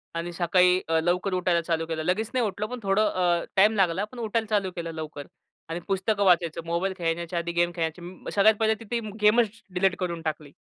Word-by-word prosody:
आणि 170 +1 -3
सकाळी 180 +1 +3
अ, 165 0 +2
लवकर 180 +3 0
उठायला 180 -2 +1
चालू 165 -1 -1
केलं. 160 -1 -3
लगेच 205 +6 0
नाही 250 -3 +2
उठलो, 210 +1 -3
पण 250 +1 -6
थोडं 185 -4 +2
टाईम 210 +3 +5
लागला 190 -1 +2
पण 250 - -9
उठायला 225 0 -1
चालू 200 -3 +1
केलं 170 -2 -4
लवकर 155 -2 -7 0.4
आणि 165 +1 -3
पुस्तकं 200 +1 0
वाचायचं. 170 -3 +3
मोबाईल 175 +3 -1
खेळण्याच्या 170 0 -2
आधी 170 0 -3
गेम 175 0 +1
खेळण्याचे, 175 +2 -5
सगळ्यात 210 +2 +5
पहिले 220 0 +3
तिथं 225 -1 -3
गेमच 225 +1 +3
डिलीट 185 0 +2
करून 170 -3 -3
टाकली. 155 -2 -4
180 Hz, 190 wpm, -26 LUFS, 170-205 Hz, 0.4 s, टाईम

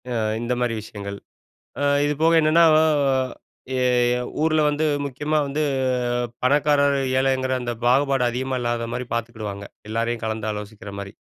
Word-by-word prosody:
அ - - -2 0.3
இந்த 120 +1 -1
மாரி 120 -2 0
விஷயங்கள். 100 -2 -7 0.6
அ - - +1 0.2
இதுபோக 155 +3 +2
என்னன்னா 160 +2 +5 0.2
அ - - +4 0.9
எ - - 0 0.6
ஊர்ல 155 0 +3
வந்து 150 +1 0 0.2
முக்கியமா 150 +3 -1
வந்து 140 +2 -2 0.8
பணக்காரர் 145 +1 +3 0.2
ஏழைங்குற 130 -1 +1
அந்த 120 -1 -3
பாகுபாடு 135 +1 +3
அதிகமா 130 +2 -2
இல்லாத 120 -1 -2
மாரி 125 - -4
பாத்துக்கிடுவாங்க, 110 -4 -5 0.2
எல்லாரையும் 115 +1 -2
கலந்து 110 -1 -3
ஆலோசிக்கிற 105 -1 -8
மாரி. 100 0 -8
125 Hz, 135 wpm, -23 LUFS, 110-145 Hz, 0.9 s, என்னன்னா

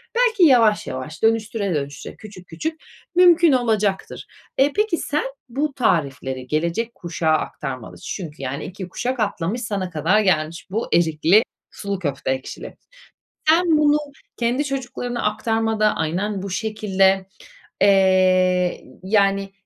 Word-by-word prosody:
Belki 465 -5 +3
yavaş 235 -8 +5
yavaş, 150 +8 -7
dönüştüre 220 -4 +1
dönüştüre, 145 -1 -5
küçük 195 -4 -13
küçük 315 - -5 0.3
mümkün 345 -2 +6
olacaktır. 215 -6 0 0.3
E, 280 +2 +3
peki 420 -4 +1
sen 300 +2 -1 0.3
bu 280 +3 -2
tarifleri 135 - -1
gelecek 170 - -1
kuşağa 165 -2 -2
aktarmalısın 135 -5 -4
çünkü 155 -7 -8
yani 135 +2 -4
2 185 0 -8
kuşak 250 +6 -3
atlamış, 205 +1 -1
sana 200 -5 -3
kadar 170 +6 +2
gelmiş 165 -5 0
bu 220 +4 -2
erikli 170 +5 +4 0.3
sulu 200 -2 -4
köfte 140 -5 -2
ekşili. 130 0 -6 0.7
Sen 330 -1 +4
bunu 295 -1 +4 0.4
kendi 245 +4 0
çocuklarına 245 -3 -4
aktarmada 220 0 +1
aynen 185 +5 -2
bu 200 - -5
şekilde, 195 -2 +1 0.5
eee, 200 - +5
y 185 -2 +3
yani 195 0 +1
200 Hz, 125 wpm, -21 LUFS, 170-240 Hz, 0.7 s, mümkün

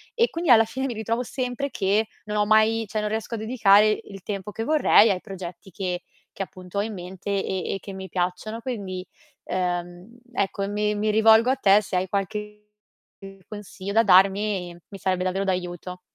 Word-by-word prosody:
E, 470 0 +3
quindi 335 -2 -3
alla 225 -1 +8
fine 265 +4 -4
mi 245 - -3
ritrovo 230 +3 -2
sempre 255 +3 -3
che 205 +2 +1 0.2
non 210 0 -3
ho 210 - +3
mai 220 +1 +3
cioè 215 +1 -2
non 210 - -2
riesco 220 +1 -3
a - - -4
dedicare 215 -2 +4
il 195 -2 -11
tempo 200 0 -5
che 225 - -4
vorrei 290 -8 +5
ai 185 - -1
progetti 190 -1 -9
che 180 -1 -3 0.3
che, 195 - -3
appunto, 185 +1 -10
ho - - +1
in 220 0 -5
mente, 185 +2 -8 0.2
e 190 -2 -2
e - - -5
che 200 - -9
mi 190 0 -7
piacciono. 185 +5 -3
Quindi, 195 -7 -5 0.4
uhm, 180 +5 -3
ecco, 195 -1 -1
mi 210 0 0
mi 215 +1 0
rivolgo 220 +2 +5
a 265 - +3
te, 200 +1 +5
se 190 -3 -3
hai 185 +1 -1
qualche 210 +1 -3 0.9
consiglio 200 -1 -7
da 225 +1 +5
darmi, 195 -2 +3
mi 200 - -9
sarebbe 185 -2 -1
davvero 190 +2 -1
d'aiuto. 180 -1 -3
205 Hz, 190 wpm, -24 LUFS, 185-220 Hz, 0.9 s, alla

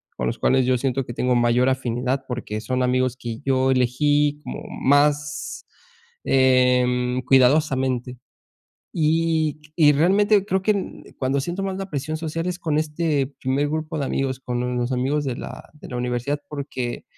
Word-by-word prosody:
con 60 - -2
los - - -3
cuales 130 -1 +3
yo 130 0 +2
siento 135 +1 -1
que 120 - -7
tengo 125 +1 +1
mayor 120 +1 +3
afinidad 130 +1 -1
porque 110 -3 -4
son 130 +4 -1
amigos 125 0 +1
que 120 -3 -6
yo 130 -1 +2
elegí 145 +4 +2
como - - -6 0.2
más, 150 - +1 0.6
em, 125 -1 +3
cuidadosamente. 130 -1 +2 0.8
Y 160 -1 +1 0.2
y 150 -3 +6
realmente 195 +7 +3
creo 190 -2 0
que 215 - +1
en 200 -2 -5
cuando 135 +1 0
siento 175 +7 -4
más 195 -1 -2
la 195 0 -5
presión 150 +2 -3
social 165 +1 -4
es 180 -1 -3
con 155 -4 -1
este 155 -2 0
primer 135 +3 0
grupo 155 +1 -3
de 140 - -1
amigos, 135 -1 -2
con 125 -1 -2
los 120 +1 -1
amigos 135 +4 0
de 130 -3 -2
la - - -9
de 150 - -12
la 125 - -5
universidad, 125 +4 -2
porque 135 -4 -5
135 Hz, 165 wpm, -23 LUFS, 125-155 Hz, 0.8 s, y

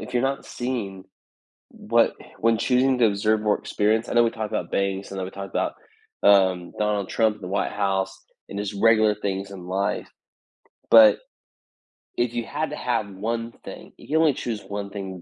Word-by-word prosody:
if - - -8
you're 120 - +2
not 135 +1 -1
seeing 110 -7 -4 0.6
what - - +1 0.2
when 115 0 +2
choosing 130 +1 +2
to 120 - +5
observe 105 +1 +1
more 105 -1 +2
experience 110 +2 0
I - - -5
know 120 0 +5
we 115 - +2
talked 110 -1 -5
about - - -2
banks, 100 0 -1
and 95 - -6
then 95 - -2
we 95 - -6
talked 100 0 -7
about, - - 0 0.5
um, 95 -3 +4
Donald 105 -2 0
Trump 110 -2 +1
in 105 - -19
the 90 - -5
White 100 +1 -1
House 95 -1 -1 0.3
and 100 - -6
his 100 0 -3
regular 110 0 +4
things 100 -1 -4
in 95 -3 -9
life, 95 +2 -2 0.8
but, 110 -2 +8 1.0
If 120 -1 0
you 120 -1 -2
had 155 +5 -3
to - - -4
have 115 -4 -1 0.3
1 115 0 -5
thing, - - -10
you - - -15
can 155 - +1
only 160 -2 +4
choose 115 -4 -4 0.2
1 100 -1 -4
thing 95 -3 -6
105 Hz, 195 wpm, -24 LUFS, 100-115 Hz, 1.0 s, but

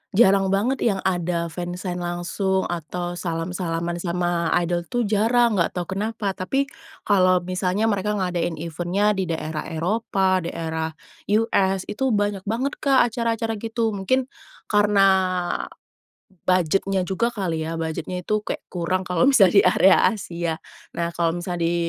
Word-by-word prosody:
jarang 195 -2 +5
banget 210 +8 +1
yang 195 -3 0
ada 175 -2 -1
fansign 175 +1 -4
langsung 175 +2 -1
atau 175 +1 -4
salam-salaman 170 0 -3
sama 175 -1 -1 0.2
idol 175 0 -2
tuh 245 -1 0
jarang, 220 +1 +2
nggak 170 - 0
tahu 180 +1 -4
kenapa. 210 +1 -2
Tapi, 270 +10 -2 0.3
kalau 185 -3 +3
misalnya 185 +3 -1
mereka 210 -1 +1
ngadain 175 -3 -1
event-nya 175 +6 0
di 190 -3 -1
daerah 155 -1 -3
Eropa, 185 +2 0
daerah 160 -2 -3 0.5
US, 195 -4 +2
itu 260 +1 -1
banyak 205 -1 -1
banget, 250 +7 -2
Kak, 265 -5 +3
acara-acara 225 -1 -1
gitu. 225 0 -1
Mungkin, 210 +6 0 0.5
karena 205 -2 +4 1.4
budget-nyajuga 190 +4 +1
kali 165 -5 -2
ya, 165 - -3
budget-nya 165 +2 -4
itu 215 0 0
kayak 210 - -5
kurang 185 +1 -1
kalau 180 +6 +2
misalnya 205 -10 +5
di - - 0
area 185 +1 +6
Asia. 170 -6 -3 0.4
Nah 170 0 -1
kalau 170 0 +1
misalnya 175 -1 -3
di 175 - 0
185 Hz, 135 wpm, -23 LUFS, 175-210 Hz, 1.4 s, area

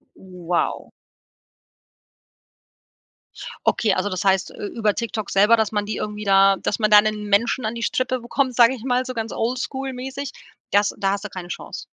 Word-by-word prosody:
Wow. 180 -2 -3 2.8
Okay, 215 -4 +2
also, 190 +2 -1
das 185 -1 -3
heißt 195 -1 +2
ü - - -5
über 210 -1 -1
TikTok 225 -3 -4
selber, 210 +4 +5
dass 220 -2 0
man 205 -1 -1
die 215 - -4
irgendwie 210 0 -5
da 195 -1 +5
dass 205 - -2
man 215 -1 +2
da 210 0 +8
'nen 215 0 -2
Menschen 220 +4 +1
an 220 +2 -2
die 230 - -5
Strippe 255 +1 -1
bekommt, 255 +1 -1
sage 235 +1 +6
ich 240 -4 -9
mal 250 0 +1
so 255 - -5
ganz 225 -2 -4
oldschool-mäßig, 265 +2 -4 0.4
das 205 0 +3
da 195 -1 0
hast 200 +1 -3
du - - -5
keine 180 -2 -8
Chance? - - -7
215 Hz, 175 wpm, -22 LUFS, 200-245 Hz, 2.8 s, da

